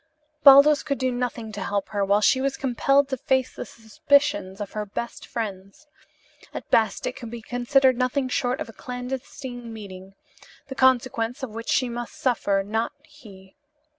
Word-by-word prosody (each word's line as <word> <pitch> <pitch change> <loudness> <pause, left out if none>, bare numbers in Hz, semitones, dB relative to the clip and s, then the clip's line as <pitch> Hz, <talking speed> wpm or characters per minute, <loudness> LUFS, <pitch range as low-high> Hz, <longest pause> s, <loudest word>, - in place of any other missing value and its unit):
Baldos 285 +1 +8
could 280 -2 -2
do 260 -1 0
nothing 245 -2 -4
to 205 -2 -7
help 200 0 -2
her, 205 -2 -1
while 200 +2 +2
she 260 +4 +3
was 275 0 -1
compelled 275 +2 +2
to 265 - -2
face 260 +1 0
the - - -7
suspicions 255 -1 0
of 205 -1 -5
her 215 - -3
best 210 +3 -6
friends. 200 +2 -6 0.7
At - - -7
best 220 -1 +2
it - - -1
could 240 -3 -8
be 235 -1 -8
considered 255 +2 +2
nothing 255 +1 0
short 250 0 -1
of - - -4
a 225 - -12
clandestine 250 -1 -7
meeting, 195 -3 -10 0.5
the - - -4
consequences 255 -1 +1
of 255 - -4
which 230 +1 -7
she 255 - +2
must 240 0 -6
suffer, 200 -6 0
not 220 +3 -2
he. 210 -12 -16
245 Hz, 170 wpm, -24 LUFS, 215-265 Hz, 0.7 s, Baldos